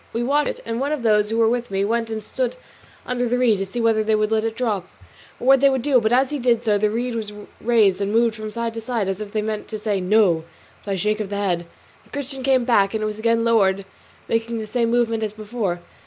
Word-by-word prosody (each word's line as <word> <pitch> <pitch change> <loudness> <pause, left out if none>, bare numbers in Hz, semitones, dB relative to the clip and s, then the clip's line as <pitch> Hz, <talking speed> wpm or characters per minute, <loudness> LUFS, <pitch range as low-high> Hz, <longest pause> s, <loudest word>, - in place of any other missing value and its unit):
We 235 - -1
watched 285 +4 +2
it, - - -6
and 230 0 -3
one 280 +2 -1
of 300 -5 -2
those 210 -2 +3
who 225 - -1
were 225 -1 +4
with 240 +1 -1
me 195 0 0
went 230 +1 -1
and 220 -1 -4
stood - - -2 0.5
under 245 -1 -1
the 245 - +1
reed 235 -5 +3
to 195 - -2
see 215 +6 -5
whether 225 -1 +2
they 215 0 +2
would 215 0 0
let 220 -1 +2
it 225 0 -2
drop, 215 -7 -2 0.5
or - - -6
what 270 +1 +6
they 280 - +6
would 265 -3 -1
do, 265 -4 +3
but 220 0 +1
as 260 +2 +3
he 295 - -2
did 240 -2 +2
so 210 -3 +2
the 210 +1 +2
reed 240 +3 -2
was 220 -2 -4 0.3
raised 215 -5 +3
and 200 0 -1
moved 230 +1 +3
from 215 -1 -6
side 235 0 -3
to 225 - -5
side, 225 -3 -2
as 195 +2 -3
if 205 -1 -6
they 215 0 -1
meant 215 -1 -3
to 220 - -5
say 210 -2 -1
"no" 180 -4 +3 0.4
by 200 - 0
a - - -2
shake 210 +3 0
of 210 -2 -3
the 200 - -3
head. 175 -4 -1 0.4
The - - -25
Christian 275 -2 -5
came 260 -2 +2
back, 205 -4 +3
and 215 - -1
it - - 0
was 215 0 -4
again 230 +1 +2
lowered, 200 -4 +2 0.4
making 230 0 -1
the 220 - -4
same 230 +2 0
movements 230 -2 +1
as 210 - -5
before. 210 -5 -3
225 Hz, 275 wpm, -22 LUFS, 210-240 Hz, 0.5 s, what